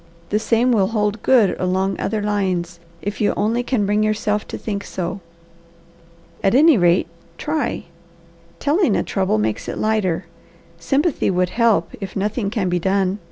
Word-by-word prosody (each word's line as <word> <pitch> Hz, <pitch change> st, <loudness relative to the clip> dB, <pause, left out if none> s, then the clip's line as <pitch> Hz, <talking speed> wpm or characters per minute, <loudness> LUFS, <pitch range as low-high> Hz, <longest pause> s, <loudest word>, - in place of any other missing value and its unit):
The 210 Hz, -, +1 dB
same 230 Hz, +3 st, +2 dB
will 200 Hz, -5 st, +3 dB
hold 210 Hz, -1 st, -1 dB
good 240 Hz, -7 st, +4 dB
along 190 Hz, +1 st, 0 dB
other 215 Hz, -2 st, -2 dB
lines, 185 Hz, -4 st, -1 dB, 0.2 s
if 205 Hz, 0 st, -4 dB
you 205 Hz, -, +2 dB
only 225 Hz, +4 st, +1 dB
can 245 Hz, -4 st, 0 dB
bring 210 Hz, +1 st, +1 dB
yourself 215 Hz, -1 st, 0 dB
to -, -, -6 dB
think 200 Hz, -2 st, -4 dB
so. 185 Hz, +1 st, -4 dB, 1.2 s
At 195 Hz, -, +3 dB
any 310 Hz, +2 st, +6 dB
rate, 175 Hz, -3 st, +3 dB, 0.3 s
try. 305 Hz, 0 st, -2 dB, 0.7 s
Telling 295 Hz, -, +2 dB
a -, -, +1 dB
trouble 190 Hz, -, 0 dB
makes 105 Hz, 0 st, -2 dB
it -, -, -4 dB
lighter. 200 Hz, -5 st, 0 dB, 0.5 s
Sympathy 275 Hz, -, +1 dB
should 180 Hz, -1 st, +1 dB
help, 225 Hz, -8 st, +2 dB
if 195 Hz, -1 st, -6 dB
nothing 205 Hz, +1 st, -1 dB
can 210 Hz, -4 st, -1 dB
be 180 Hz, 0 st, 0 dB
done. 195 Hz, +2 st, 0 dB
205 Hz, 160 wpm, -20 LUFS, 185-225 Hz, 1.2 s, any